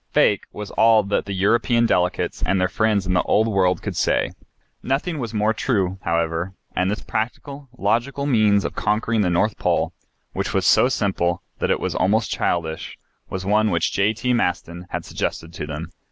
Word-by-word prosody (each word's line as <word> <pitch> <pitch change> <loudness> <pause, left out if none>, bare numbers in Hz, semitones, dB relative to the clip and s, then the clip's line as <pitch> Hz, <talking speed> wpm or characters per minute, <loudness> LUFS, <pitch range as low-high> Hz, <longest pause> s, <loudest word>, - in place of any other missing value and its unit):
"Fake," - - +3
was 105 -1 -7
all 110 -1 +5
that 100 +1 -1
the 100 - -4
European 115 +5 +2
delegates 90 -5 0
and 95 +1 +1
their 90 - +2
friends 105 +1 +1
in 90 - 0
the 90 - +3
Old 110 +2 +2
World 95 -4 +1
could - - -4
say. - - +1 0.5
Nothing 145 +5 -1
was 120 -4 -4
more 110 0 +1
true, 95 -5 -1
however, 85 +2 -1 0.2
and 90 +1 +1
this 105 - -3
practical, 135 +5 -4
logical 120 +7 0
means 105 -7 +3
of - - -3
conquering 110 +1 0
the 95 - +2
North 95 +5 +1
Pole, - - +1 0.4
which - - -3
was - - +1
so 125 - +5
simple 90 -7 0 0.2
that - - 0
it - - +2
was - - -2
almost 110 +4 +1
childish, 80 -2 -2 0.3
was 95 0 -4
one 105 +2 +3
which 85 -4 +1
J.T. 110 +5 +1
Maston 90 -5 -2
had - - -4
suggested 80 +1 -4
to 75 - -5
them. 75 +3 -6
100 Hz, 180 wpm, -22 LUFS, 90-115 Hz, 0.5 s, all